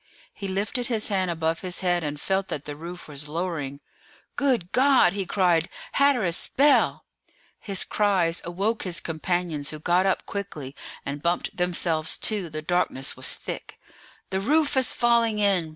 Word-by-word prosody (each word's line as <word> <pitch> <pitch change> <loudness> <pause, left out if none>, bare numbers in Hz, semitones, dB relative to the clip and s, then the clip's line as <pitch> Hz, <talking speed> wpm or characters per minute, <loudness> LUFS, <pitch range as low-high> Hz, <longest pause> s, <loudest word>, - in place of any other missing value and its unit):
He 200 - -6
lifted 205 +6 -1
his 225 -3 0
hand 190 -3 +1
above 165 -1 -1
his 180 -2 -2
head, 175 -2 +1
and 150 -1 -4
felt 190 +4 0
that 150 - -5
the 145 - -6
roof 170 +3 -8
was 145 0 -3
lowering. 150 -4 -3 0.5
"Good 245 -11 +1
God!" 260 -9 +5
he 195 -2 -3
cried; 175 -4 +2 0.2
"Hatteras! 245 -12 +2
Bell!" 285 +2 +4 0.5
His 195 -3 +1
cries 185 -5 +1
awoke 195 +6 -1
his 180 -2 -3
companions, 165 -2 -2
who 155 - -6
got 175 +5 +2
up 190 - 0
quickly, 155 -9 -6 0.3
and 140 +1 -4
bumped 170 +2 -1
themselves 170 -3 +1
too; 205 -6 -1
the 155 0 -6
darkness 170 -5 0
was - - +1
thick. - - -7 0.5
"The 190 - 0
roof 295 +5 +2
is 260 -1 +3
falling 235 -2 +2
in!" 195 -6 +2
180 Hz, 160 wpm, -25 LUFS, 165-205 Hz, 0.5 s, God